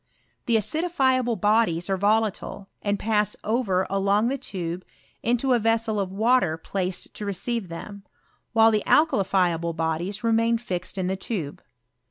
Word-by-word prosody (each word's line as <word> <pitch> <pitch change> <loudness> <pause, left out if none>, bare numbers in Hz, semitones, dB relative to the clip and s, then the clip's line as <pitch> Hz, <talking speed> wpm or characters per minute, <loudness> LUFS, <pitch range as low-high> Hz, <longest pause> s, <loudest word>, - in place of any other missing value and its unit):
The 235 - +3
acidifiable 260 - +1
bodies 205 -6 +2
are 195 - +1
volatile, 205 0 0
and 205 0 0
pass 210 -1 +1
over 205 -5 +1
along 200 +3 +1
the 275 - -1
tube 180 -7 -5 0.4
into 245 +3 +1
a 240 - +3
ves 225 +1 +2
sel 220 -2 -1
of 190 -2 -2
water 205 -5 +2
placed 185 +2 -3
to - - -6
receive 200 +1 -3
them, 200 +4 -8 0.5
while 225 -1 +5
the 215 -1 +1
alka 310 -2 +4
lifiable 175 -4 +1
bodies 165 +6 -2
remain 230 0 +2
fixed 185 -5 -5
in 185 - -1
the 190 +1 0
tube. 185 -7 -5
205 Hz, 155 wpm, -25 LUFS, 185-230 Hz, 0.5 s, while